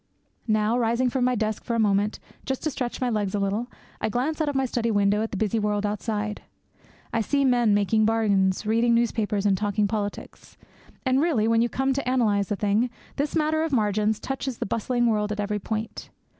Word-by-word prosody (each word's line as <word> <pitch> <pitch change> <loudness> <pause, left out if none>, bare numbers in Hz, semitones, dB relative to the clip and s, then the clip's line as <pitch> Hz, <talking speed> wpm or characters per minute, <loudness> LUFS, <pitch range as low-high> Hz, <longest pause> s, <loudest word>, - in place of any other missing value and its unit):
Now, 215 +2 +2
rising 240 +2 +1
from 255 -1 +1
my 250 0 +2
desk 215 -1 -2
for 235 - -2
a - - 0
moment, 205 0 +1 0.2
just 265 -1 -3
to 310 - 0
stretch 245 -3 -4
my 250 -2 0
legs 210 -3 -1
a - - 0
little, 200 +4 -1 0.3
I - - 0
glance 275 +8 -1
out 305 - +1
of 285 - -4
my 270 0 +2
study 235 -2 -1
window 205 -1 +2
at 220 - -2
the 200 - -5
busy 220 +2 0
world 210 0 0
outside. 210 0 -3 0.7
I 230 - +2
see 280 +5 +1
men 240 -5 +3
making 215 +2 +2
bargains, 205 -3 +2
reading 230 +2 +3
newspapers, 215 -3 0
and 200 -2 +4
talking 205 +1 0
politics. 205 -1 -5 0.5
And 260 +1 +3
really, 285 -10 +2
when 230 0 +3
you 240 - +1
come 265 +2 0
to 265 -2 -1
analyse 210 -6 +1
the 205 - 0
thing, 210 +4 +1 0.3
this 285 +1 -1
matter 315 0 +1
of 325 - 0
the 280 - 0
margin 210 -1 +2
touches 270 +1 -4
that - - -3
bustling 240 +2 0
world 210 -2 +1
at 210 - -3
every 210 0 -1
point. 220 +2 -5
220 Hz, 210 wpm, -25 LUFS, 210-250 Hz, 0.7 s, and